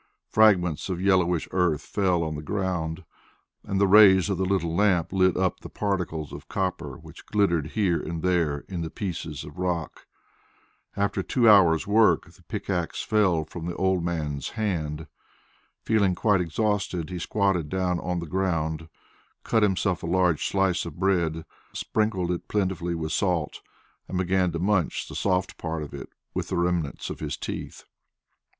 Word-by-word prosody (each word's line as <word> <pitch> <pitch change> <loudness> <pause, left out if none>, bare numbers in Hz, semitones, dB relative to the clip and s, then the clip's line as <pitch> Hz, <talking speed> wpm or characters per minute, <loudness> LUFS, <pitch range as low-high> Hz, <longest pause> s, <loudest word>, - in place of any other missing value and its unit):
Fragments 95 -7 +3
of 90 -2 -2
yellowish 90 -3 +2
earth 85 -6 +1
fell 90 -1 +1
on 80 -1 -3
the 75 - -5
ground, 90 -1 -3 0.6
and 95 -1 -2
the 100 - +5
rays 100 -1 +7
of 95 - -1
the 95 - +1
little 90 -4 0
lamp 95 -4 +2
lit 95 -1 +3
up 95 -2 0
the - - -10
particles 90 -7 -3
of - - -9
copper - - -3
which - - -14
glittered 85 -7 +1
here 95 -6 +1
and 80 -1 -5
there 85 -6 +1
in 90 -3 -4
the 80 - -3
pieces 80 - -5
of 75 +4 -11
rock. 90 -3 -3 0.9
After 100 -1 0
two 120 +4 +2
hours' 95 -6 +6
work 110 +2 +3
the - - -21
pickaxe 90 -4 -3
fell 95 -7 +2
from 85 +2 -7
the 85 - -4
old 95 -2 +1
man's 75 -5 -2
hand. 80 -8 -2 0.8
Feeling 100 -5 +2
quite 105 -2 +2
exhausted, 95 -1 -1
he 90 - -4
squatted 95 -4 0
down 90 -2 0
on 90 +1 -2
the 85 - -3
ground, 80 -2 -1 0.5
cut 110 - +2
himself 95 -3 +1
a - - -5
large 90 -2 +2
slice 95 -3 +1
of 85 -2 -8
bread, 85 -4 +1 0.3
sprinkled 100 -5 -1
it 90 - -4
plentifully 90 -4 -1
with 80 -1 -3
salt, 85 -3 -1 0.5
and 95 - -3
began 95 0 +1
to 85 - -3
munch 95 0 0
the - - -9
soft 95 -1 -1
part 80 -2 -3
of 75 - -9
it - - -8 0.2
with - - -3
the - - -2
remnants 85 -4 -1
of - - -7
his - - -4
teeth. - - -6
90 Hz, 165 wpm, -26 LUFS, 80-95 Hz, 0.9 s, rays